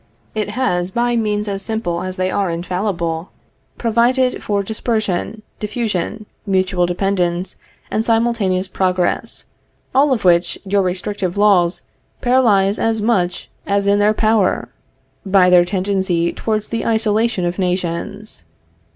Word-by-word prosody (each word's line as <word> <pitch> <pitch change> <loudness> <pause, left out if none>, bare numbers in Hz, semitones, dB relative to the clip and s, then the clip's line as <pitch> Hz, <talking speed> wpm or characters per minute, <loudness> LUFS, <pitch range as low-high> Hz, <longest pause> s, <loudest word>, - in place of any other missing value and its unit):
It 215 -1 -2
has, 180 -9 0
by 240 +4 0
means 210 -2 0
as 195 -1 -3
simple 195 -6 -2
as 185 0 -5
they 185 0 0
are 195 -2 0
infallible, 170 -1 -2 0.5
provided 245 +3 +2
for 200 -1 -1
dispersion, 215 -1 -2 0.2
diffusion, 215 -1 -3 0.2
mutual 185 -3 +1
dependence, 180 -1 -1 0.4
and 215 - 0
simultaneous 225 -5 +1
progress; 185 -1 -1 0.5
all 280 +2 +4
of 230 -7 0
which, 170 -1 +3
your 200 +1 +2
restrictive 185 0 -2
laws 195 -4 +3 0.4
paralyze 220 -6 +3
as 225 -1 +1
much 200 -5 0 0.2
as 200 0 +1
is 200 - +4
in 205 - +2
their 210 +1 +3
power, 215 -3 +1 0.5
by 190 -2 +4
their 175 -1 +6
tendency 185 -2 0
towards 215 -1 -2
the 230 -1 -2
isolation 220 -3 +1
of 175 +2 -2
nations. 180 - -3
200 Hz, 130 wpm, -18 LUFS, 180-220 Hz, 0.5 s, their